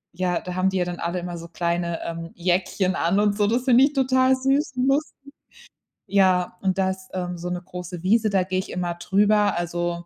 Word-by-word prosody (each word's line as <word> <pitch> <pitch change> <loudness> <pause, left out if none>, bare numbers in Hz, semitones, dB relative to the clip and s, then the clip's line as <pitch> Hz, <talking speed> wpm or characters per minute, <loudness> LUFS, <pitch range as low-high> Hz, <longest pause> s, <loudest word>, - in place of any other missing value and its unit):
ja, 180 -1 -1
da 180 - -6
haben 185 +1 +2
die 190 - -2
ja 180 - +1
dann 175 -1 -5
alle 170 +2 -2
immer 175 0 -6
so 170 - -9
kleine, 170 0 -2
ähm, 165 0 -5
Jäckchen 185 +1 0
an 175 +4 +1
und 205 -1 +2
so, 205 -1 +2
das 240 +3 +1
find 250 -1 +5
ich 280 +2 +4
total 260 -1 +3
süß 270 +3 0
und 255 +1 +1
lustig. 280 0 -2 0.7
Ja, 185 -2 +2
und 190 -1 0
da 190 -1 +2
ist, 190 0 -9
ähm, 180 -1 -3
so 175 +1 -5
'ne 180 0 -3
große 180 -1 -8
Wiese, 215 +3 +3
da 195 -2 +2
geh 185 0 -3
ich 185 - -3
immer 175 -1 -3
drüber, 205 +3 +2
also 175 0 -3
185 Hz, 220 wpm, -23 LUFS, 175-210 Hz, 0.7 s, find